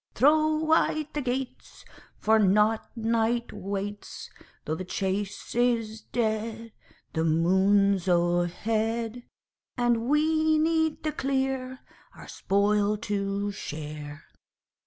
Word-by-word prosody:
Throw 310 +4 +4
wide 310 -1 +1
the 295 - -2
gates 255 0 -5 0.3
For 220 +1 +3
nought 210 +2 +3
night 230 +1 0
waits; 200 +1 -6 0.3
Though 155 - -2
the 160 - -4
chase 195 +2 -3
is 230 -2 0
dead 225 0 -2 0.4
The 160 - 0
moon's 190 +4 +3
o'erhead 215 +7 0 0.6
And 240 0 +1
we 315 +1 +3
need 320 -1 +1
the 310 - 0
clear 265 -2 -2 0.3
Our - - -12
spoil 205 +1 +1
to 200 -1 -2
share. 150 -4 -7
220 Hz, 100 wpm, -27 LUFS, 195-255 Hz, 0.6 s, Throw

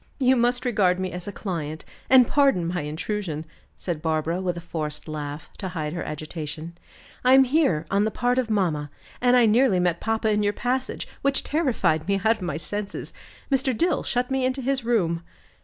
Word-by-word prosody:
"You 260 -1 +4
must 245 +1 +1
regard 195 -7 +2
me 185 0 -2
as 180 +1 -7
a - - -3
client, 160 -6 -5 0.2
and 255 -2 +7
pardon 275 -12 +3
my 175 +1 -2
intrusion," 155 +1 -4 0.3
said 170 -4 -4
Barbara, 160 +2 0
with 180 -2 -2
a - - -3
forced 155 -3 -5
laugh, 150 -1 -6
to 195 - -3
hide 160 -4 -4
her 175 - -3
agitation. 155 +1 -6 0.5
"I 255 +1 +6
am 265 0 +8
here 260 - +2
on 200 +1 +3
the 215 - +1
part 245 +3 +1
of 245 -3 -1
mamma 165 -9 0 0.3
and 250 0 +5
I 240 - +6
nearly 225 -3 +4
met 175 -1 +1
papa 225 -1 0
in 210 0 +2
your 205 0 +1
passage, 255 +3 -2
which 275 0 +1
terrified 250 - +1
me 200 - +2
out 225 +1 +4
of - - -16
my 175 -5 -2
senses. 200 +6 -5 0.4
Mr. 265 -3 +1
Dill 345 +6 +2
shut 250 +1 -1
me 265 -1 +1
into 260 +1 -1
his 265 0 0
room." 180 -8 +1
200 Hz, 195 wpm, -25 LUFS, 165-250 Hz, 0.5 s, am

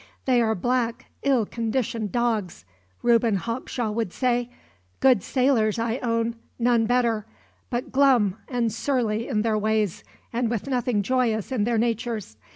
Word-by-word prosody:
"They 250 -2 +4
are 220 -1 +2
black, 240 +3 -1 0.2
ill 265 -5 +2
conditioned 230 -2 -2
dogs," 220 - -1 0.4
Reuben 230 -2 +4
Hawkshaw 230 +2 -3
would 225 -3 -2
say; 245 0 0 0.5
"good 255 -6 +5
sailors, 250 -5 +2
I 230 +2 -1
own; 230 -1 -1 0.2
none 235 -2 +2
better; 230 -3 +1 0.4
but 250 +2 -3
glum 250 -8 +4
and 235 -4 -1
surly 235 -5 -1
in 210 -1 0
their 220 -2 +1
ways, 215 -3 0 0.3
and 235 0 0
with 230 -3 -2
nothing 245 -5 0
joyous 235 -2 0
in 225 -6 +1
their 235 0 +1
natures. 225 - -2
230 Hz, 145 wpm, -25 LUFS, 220-245 Hz, 0.5 s, good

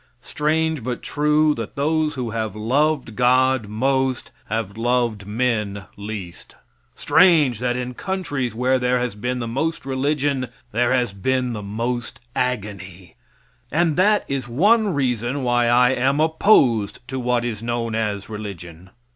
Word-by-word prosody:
Strange, 155 -2 0
but 125 +1 -4
true, 150 +1 +2
that 115 -5 -6
those 155 +1 0
who 125 -4 -3
have 110 -2 -3
loved 130 +2 0
God 130 -1 +3
most 130 +4 0
have 105 -2 -3
loved 115 -3 0
men 105 -3 -1
least; 100 -4 -8 0.4
strange 155 - +4
that 125 0 0
in 125 0 -4
countries 145 - -3
where 130 +2 +2
there 125 0 +1
has 125 -3 -2
been 125 +5 -3
the 120 -2 -3
most 140 +5 -2
religion 135 0 0 0.2
there 120 +3 +1
has 125 -5 +1
been 125 +4 -1
the 105 - -5
most 115 +4 -4 0.2
agony; 100 -7 -4 0.6
and 165 -1 +2
that 205 +3 +3
is 135 -3 -3
one 205 - +3
reason 130 -2 -1
why 120 -1 +2
I 125 +1 +5
am 135 +3 +1
opposed 140 - +3
to 130 0 -3
what 125 -1 0
is 110 -3 -4
known 115 -1 -2
as 105 -3 -2
religion. 95 -5 -8
125 Hz, 145 wpm, -22 LUFS, 110-140 Hz, 0.6 s, I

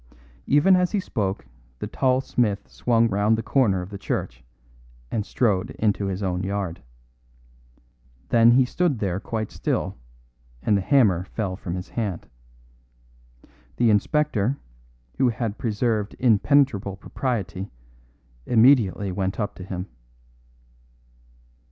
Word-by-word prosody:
Even 145 +7 +5
as 180 +1 +1
he 205 - +2
spoke 100 - -3 0.3
the - - -5
tall 130 0 +1
smith 105 -6 -1
swung 115 -1 +1
round 105 +1 +2
the 115 - -3
corner 105 -8 +2
of 90 - -11
the 100 - -7
church, 60 -10 -4 0.7
and 110 - -1
strode 100 -4 0
into 105 -2 0
his 95 +1 -3
own 90 -1 -1
yard. 95 -3 -3 1.5
Then 115 0 +6
he 130 +1 +5
stood 165 +1 0
there 95 -3 -2
quite 110 +1 -4
still, - - -2 0.7
and 105 - +3
the 100 - +1
hammer 95 -7 +3
fell 95 -2 -3
from 90 -3 -5
his 90 0 -6
hand. 105 -7 -4 1.5
The 120 -2 +4
inspector, 135 +1 +1 0.6
who 130 - +4
had 115 -2 -3
preserved 110 -2 -1
impenetrable 120 -3 +2
propriety, 100 -3 -4 0.8
immediately 110 -5 +4
went 95 +2 -2
up 105 - -2
to 90 - -10
him. 90 -1 -5
105 Hz, 125 wpm, -24 LUFS, 95-120 Hz, 1.5 s, Then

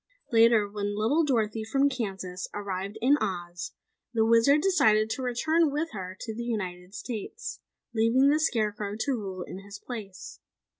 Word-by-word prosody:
"Later, 230 -2 +5
when 205 0 -3
little 275 +10 +3
Dorothy 225 -6 0
from 270 +6 +2
Kansas 195 -8 -4
arrived 200 0 -4
in 280 +4 +5
Oz, 175 -2 -3 0.4
the 220 -1 +4
Wizard 230 +6 +5
decided 220 - +3
to 245 - -2
return 310 +6 +2
with 300 +4 -2
her 185 -2 -6
to 220 - -4
the 230 - -5
United 190 -5 -4
States, 250 - -6 0.3
leaving 235 +5 +4
the 300 +2 +3
Scarecrow 210 -7 0
to 280 - 0
rule 195 -7 -3
in 185 - -8
his 200 +1 -10
place. 205 -5 -8
220 Hz, 155 wpm, -28 LUFS, 200-255 Hz, 0.4 s, Later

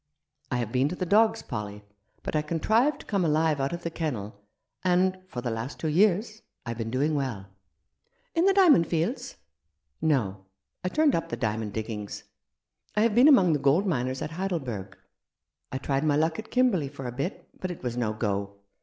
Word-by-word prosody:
I 125 - 0
have 120 -3 -2
been 130 +3 +2
to 180 - -4
the 185 - -2
dogs, 220 +4 +3
Polly, 105 -3 -6 0.4
but - - -3
I 155 - +3
contrived 220 - +1
to - - -15
come 200 -4 0
alive 155 -1 +2
out 135 - 0
of 170 0 -5
the 170 - -3
kennel; 110 -11 -4 0.4
and 185 +1 +2
— - - -31
for 125 - -5
the 120 -1 -2
last 115 +5 -4
two 160 - -1
years 210 +6 +2
— - - -50
I've 115 -1 -5
been 115 -1 -2
doing 140 +6 +1
well." 130 -9 -2 0.5
" - - -44
In 335 +1 +2
the 390 - +5
diamond 320 - +6
fields? 175 - -2 0.2
" 75 +2 -52
" 65 - -48
No; 105 -11 0 0.4
I 180 - 0
turned 305 +4 +3
up 165 0 -1
the - - -3
diamond 110 -3 -2
diggings. 105 -2 -5 0.7
I 210 - +3
have 225 -1 +3
been 245 +6 +7
among 190 - +6
the 150 - +1
gold 140 +8 +3
miners 130 -7 -1
at - - -5
Heidelberg. 135 - -4 0.7
I 130 - -2
tried 135 +1 -1
my 150 -2 +3
luck 160 +5 +1
at 220 - -8
Kimberley 225 - +2
for 135 -2 -8
a 125 - -3
bit, 140 - -4
but 185 - -3
it 175 - -7
was 120 -1 -2
no 120 -3 0
go. 100 -2 -2
150 Hz, 210 wpm, -27 LUFS, 115-185 Hz, 0.7 s, been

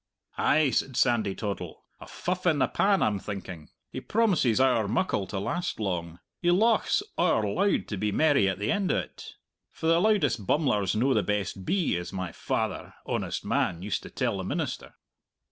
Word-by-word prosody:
"Ay," 150 -2 +3
said 130 0 -1
Sandy 115 -7 +2
Toddle, 100 -3 -5 0.2
"a - - -11
fuff 180 0 -3
in 160 -4 +3
the 135 - +2
pan, 200 -1 +2
I'm 105 -2 +1
thinking. 95 -6 -7 0.2
He - - -5
promises 180 - +2
owre 125 -5 +3
muckle 110 - 0
to 100 - -5
last 170 - -3
long! 85 -5 -3 0.2
He 175 - +2
lauchs 220 - +3 0.2
owre 160 -11 +3
loud 195 - +1
to 105 - -3
be 105 +2 -1
merry 145 -7 +3
at 95 - -2
the 105 +3 -1
end 200 -2 +1
o't. - - -4 0.3
For - - -8
the 165 +1 +4
loudest 150 - +1
bummler's 105 - +1
no 130 +5 +2
the - - +3
best 100 -2 -2
bee, 185 - +1
as 90 - -6
my 95 -2 -4
father, - - -3
honest - - -3
man, 85 0 0
used 100 -3 -2
to - - -10
tell - - -1
the - - -3
minister." - - -4
120 Hz, 180 wpm, -27 LUFS, -, 0.3 s, the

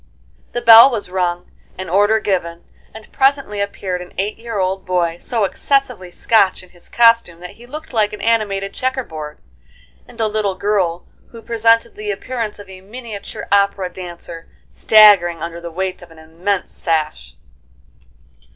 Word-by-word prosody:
A 240 - -1
bell 230 +2 +9
was 215 -7 -5
rung, 180 -1 -2 0.3
an 185 0 -6
order 205 +5 +3
given, 175 -5 -3 0.3
and 220 -1 -13
presently 270 -7 +1
appeared 190 -2 -4
an 180 - -12
eight 205 +3 -3
year 230 -2 -6
old 190 0 -1
boy, 175 -2 -1
so 230 +2 -2
excessively 250 -2 -1
Scotch 195 +1 +1
in 185 - -17
his 175 -1 -20
costume 230 -7 +3
that 180 - -8
he 240 +1 -15
looked 305 +2 -9
like 215 -2 +1
an 210 - -8
animated 200 -4 -1
checkerboard; 165 - -4 0.7
and - - -16
a 225 - +2
little 210 -2 -1
girl, 185 -3 -1 0.2
who 230 -1 -13
presented 230 0 +2
the 210 0 -7
appearance 225 +1 -4
of 205 -1 -12
a 190 -1 -12
miniature 215 0 -8
opera 200 -2 +1
dancer 170 -2 -10 0.2
staggering 195 -7 +5
under 170 0 -6
the 170 - -7
weight 185 +2 -4
of 175 - -14
an 165 - -17
immense 170 +5 -3
sash. 150 - -3
200 Hz, 160 wpm, -18 LUFS, 175-225 Hz, 0.7 s, bell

